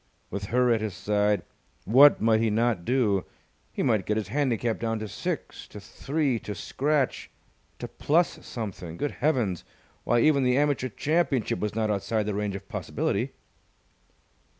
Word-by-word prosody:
With 100 +1 -4
her 125 +3 +2
at 110 - 0
his 105 -4 -3
side, 105 -1 +1 0.4
what 135 +7 +7
might 110 0 +3
he 115 - +2
not 110 -4 0
do? 110 -7 +2 0.5
He - - -2
might 110 -7 +1
get 105 - +1
his 105 -3 -3
handicap 120 -3 0
down 115 -1 -1
to 110 0 -5
six - - -5
to - - -10
three 140 -4 -2
to 105 - -6
scratch 140 +5 -1 0.5
to - - -6
plus 165 +4 0
something! 90 -7 -6
Good 145 - -2
heavens, 120 - +1 0.4
why, 120 -1 +2
even 150 -1 +4
the 125 0 +2
Amateur 140 -3 +1
Championship 150 -1 0
was 105 0 -3
not 110 -1 0
outside 105 +2 -1
the 105 - -2
range 100 -1 -2
of 100 - -8
possibility. - - -2
115 Hz, 160 wpm, -27 LUFS, 105-135 Hz, 0.5 s, what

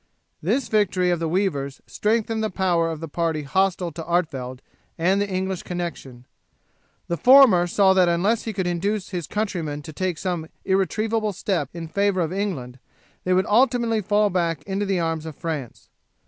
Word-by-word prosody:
This 230 - 0
victory 185 -4 +2
of 175 - 0
the 165 -1 -1
weavers 155 -7 -1
strengthened 225 +1 0
the 215 - 0
power 175 -4 +1
of 160 -1 -5
the 165 - -4
party 160 -1 -1
hostile 180 +3 0
to 165 +1 -7
Artevelde 140 -7 -2 0.3
and 185 +4 +2
the 205 - -1
English 190 -1 -2
connection; 175 -6 -5
and 120 0 -16 0.8
the 170 - -1
former 245 - +7
saw 190 +2 +4
that 185 -2 +4
unless 195 +7 +1
he 225 - -2
could 190 -3 -2
induce 190 +4 -1
his 175 -5 -4
countrymen 170 -9 -3
to 155 - -9
take 185 0 -2
some 175 -3 -3 0.2
irretrievable 215 +3 0
step 170 -7 -1
in 170 -1 -7
favour 200 +2 +1
of 165 +1 -1
England 145 -11 -3 0.5
they 185 - +2
would 185 - +2
ultimately 235 -1 +2
fall 205 +1 +2
back 170 -4 -1
into 195 +1 -2
the 195 -2 +1
arms 165 -1 -2
of 155 - -7
France. 155 -7 -5
180 Hz, 175 wpm, -23 LUFS, 165-205 Hz, 0.8 s, former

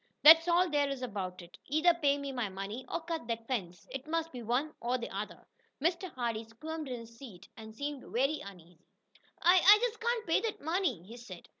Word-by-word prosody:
That's 325 +2 +10
all 350 +1 +4
there 290 -3 +1
is 270 -2 -4
about 190 -6 -5
it. 170 - -15
Either 315 +5 +4
pay 285 -4 +2
me 280 -1 -5
my 245 -5 -2
money 195 +6 -6
or 335 - -2
cut 325 -6 -4
that 230 -1 -3
fence. 180 -9 -4
It 270 +2 -6
must 330 0 -1
be 250 - -7
one 250 +7 -1
or 245 +2 0
the 235 -5 -6
other." 205 +2 -6 0.3
Mr. 345 +4 0
Hardee 230 -3 -2
squirmed 305 +8 -7
in 245 -2 -4
his 230 0 -13
seat, 200 -9 -11
and 220 -1 -10
seemed 285 +2 -5
very 275 +5 +1
uneasy. 175 -4 -12 0.6
"I 355 +1 +6
I 410 +3 +9
just 465 -1 -1
can't 470 -1 -1
pay - - +2
that 455 -2 -3
money," 320 - -1
he 225 +6 -11
said. 190 -8 -11
265 Hz, 210 wpm, -32 LUFS, 225-325 Hz, 0.6 s, That's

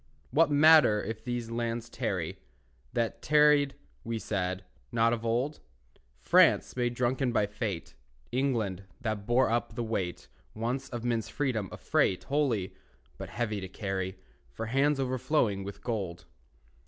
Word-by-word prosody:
What 155 +5 +4
matter 145 -7 +6
if 110 +1 -5
these 120 -1 -3
lands 115 0 -2
tarry, - - -3 0.5
That 115 -1 -1
tarried 150 -2 +4 0.3
(we 115 0 -3
said) 95 -3 -2 0.3
not 115 0 +3
of 115 -1 -3
old? 120 +6 0 0.6
France, - - +4
made 120 -1 0
drunken 125 +1 +1
by 105 - +2
fate, 105 - -4 0.4
England, 115 -8 -1
that 110 -5 -3
bore 120 0 +3
up 115 -1 -1
the 120 - -2
weight 95 -6 -3 0.3
Once 120 +5 -2
of 120 -2 -5
men's 115 -2 -1
freedom, 120 - -1
a - - -7
freight 90 - +1
Holy, 135 -10 0 0.5
but - - -6
heavy 110 -3 -2
to 95 - -5
carry 95 -1 -3 0.3
For 85 - -5
hands 135 +5 +2
overflowing 125 -5 +1
with 100 +1 -8
gold. 100 -8 -3
115 Hz, 140 wpm, -30 LUFS, 105-130 Hz, 0.6 s, matter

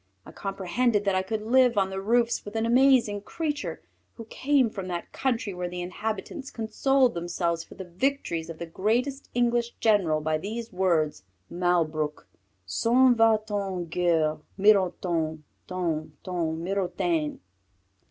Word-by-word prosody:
I - - -11
comprehended 205 +3 -1
that 200 - +2
I 185 - +2
could 215 +3 -3
live 245 0 +4
on 190 -1 +2
the 190 0 -3
roofs 235 +3 +1
with 205 +1 -9
an 225 0 +1
amazing 240 -4 +4
creature 295 +6 -4 0.3
who 230 - -9
came 275 -3 +2
from 195 -4 -6
that 175 -1 -5
country 235 -6 -1
where 180 0 -4
the 180 0 -5
inhabitants 215 +8 -5
consoled 255 +3 +1
themselves 170 -1 -2
for - - -14
the 190 - -7
victories 175 -3 -2
of 165 - -7
the 170 - -5
greatest 240 +11 -1
English 240 -1 +1
general 190 -8 +3
by 155 0 -1
these 225 +5 -5
words: 170 - +1 0.3
Malbrouk 160 -4 0 0.4
s'en 240 - +4
va 225 -2 +4
t 215 - -7
en 190 -3 -2
guerre, 165 -2 +1 0.2
Mironton, 175 -6 +2 0.2
TON, 165 -4 -2
TON, 165 -3 -2
MIRONTAINE! 175 -4 -1
195 Hz, 145 wpm, -27 LUFS, 170-230 Hz, 0.4 s, live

